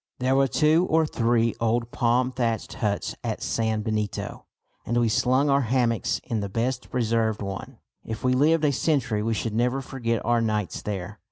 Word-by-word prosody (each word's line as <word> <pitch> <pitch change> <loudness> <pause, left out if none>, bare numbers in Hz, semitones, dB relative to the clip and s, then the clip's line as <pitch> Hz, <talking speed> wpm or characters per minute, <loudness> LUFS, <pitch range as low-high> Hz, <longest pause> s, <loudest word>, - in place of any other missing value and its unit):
There 130 +1 +1
were 135 0 +4
two 155 +7 +3
or 160 0 +3
three 115 -4 +1
old 115 +1 0
palm 125 +2 +1
thatched 120 -3 -2
huts 105 -5 -2
at - - -3
San 110 -1 0
Benito, 105 -2 -3 0.4
and 120 - -1
we 120 -1 +3
slung 130 +5 +2
our 140 0 +3
hammocks 120 -2 +1
in 115 - -2
the 100 -1 -3
best 125 +5 -2
preserved 115 -3 0
one. 100 -1 -6 0.3
If 110 0 -6
we 130 0 +3
lived 155 +4 +3
a 145 - +3
century 130 -8 0
we 115 +1 0
should 110 0 -2
never 125 +4 +1
forget 120 -4 -3
our 120 0 +2
nights 105 -4 -1
there. 100 0 -5
115 Hz, 180 wpm, -25 LUFS, 110-130 Hz, 0.4 s, were